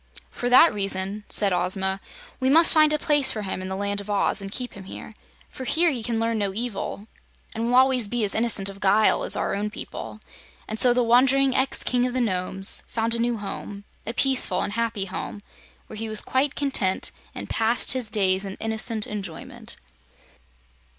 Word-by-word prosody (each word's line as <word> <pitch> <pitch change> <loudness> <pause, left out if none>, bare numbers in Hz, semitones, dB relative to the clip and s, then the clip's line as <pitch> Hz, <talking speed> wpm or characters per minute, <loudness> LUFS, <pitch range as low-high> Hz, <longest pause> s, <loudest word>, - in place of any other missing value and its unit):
"For 245 - -3
that 290 +7 +7
reason," 195 0 -2
said 200 -3 +2
Ozma, 190 +2 -1 0.4
"we 260 0 +1
must 325 +4 +6
find 310 -2 +5
a 305 - +2
place 290 -3 +3
for 215 - -4
him 190 -1 -4
in 185 - -5
the 190 - -3
Land 200 +1 -2
of 200 - -11
Oz, 200 0 +2
and 195 0 -7
keep 250 +2 -5
him 195 -1 -11
here. 205 - -10 0.3
For 260 - -9
here 325 +6 +2
he 250 -4 -4
can 230 0 -2
learn 225 -1 0
no 195 -2 -2
evil 215 -3 -4 0.5
and 230 +1 -2
will 245 - +1
always 255 -3 +4
be 240 +1 -1
as 200 - 0
innocent 220 -4 +2
of 195 0 -4
guile 205 +2 +3
as - - +2
our - - -1
own 205 +1 -2
people." 210 - -8 0.5
And 220 - -4
so 250 - +6
the 245 0 +2
wandering 260 +3 +3
ex 265 +1 +1
King 250 0 +1
of 250 - -5
the - - +1
Nomes 190 -3 0
found 230 0 -1
a 235 - 0
new 235 0 0
home, 205 0 -7 0.2
a 230 - -2
peaceful 265 -1 +2
and 205 - -4
happy 230 -3 -2
home, 195 +2 -7 0.4
where 215 - -10
he 225 +1 -4
was 215 -1 +3
quite 270 +2 0
content 265 -10 0 0.2
and - - -6
passed 230 +1 +2
his 255 -5 -2
days 195 -3 +1
in 195 -1 -6
innocent 220 0 -1
enjoyment. 195 -6 -7
220 Hz, 200 wpm, -24 LUFS, 200-250 Hz, 0.5 s, that